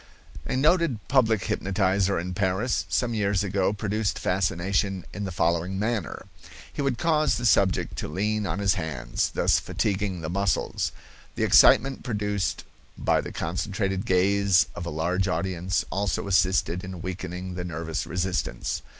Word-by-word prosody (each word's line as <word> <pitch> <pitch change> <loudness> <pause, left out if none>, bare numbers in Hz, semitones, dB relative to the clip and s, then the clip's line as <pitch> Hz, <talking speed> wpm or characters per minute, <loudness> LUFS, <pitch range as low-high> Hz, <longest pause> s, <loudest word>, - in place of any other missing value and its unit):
A - - -1
noted 155 -1 +3
public 115 -7 +3
hypnotizer 95 0 +1
in 90 +2 -3
Paris 95 +6 0
some 120 -2 0
years 100 -3 +1
ago 100 -1 +1
produced 105 0 -1
fascination 95 +1 0
in 100 0 -4
the 95 - -4
following 85 +2 0
manner: 105 -3 -2 0.5
He - - -3
would 135 -4 0
cause 155 0 +2
the 120 - -4
subject 95 -6 +2
to - - -3
lean 105 +5 -1
on 85 +1 -2
his 100 -1 +2
hands, 70 -10 -2
thus - - +2
fatiguing 100 -3 -2
the 80 - -4
muscles. 100 +1 0 0.4
The - - -1
excitement 135 +1 +5
produced 105 -4 -2 0.3
by - - +2
the - - -7
concentrated 95 +4 -2
gaze 95 0 +4
of 85 - -6
a - - -2
large 90 +5 0
audience 90 +1 -1
also 100 0 -1
assisted 95 -2 +2
in 95 -3 -7
weakening 90 0 -5
the 90 0 -4
nervous 80 -1 -4
resistance. 90 -7 -2
95 Hz, 150 wpm, -26 LUFS, 90-105 Hz, 0.5 s, excitement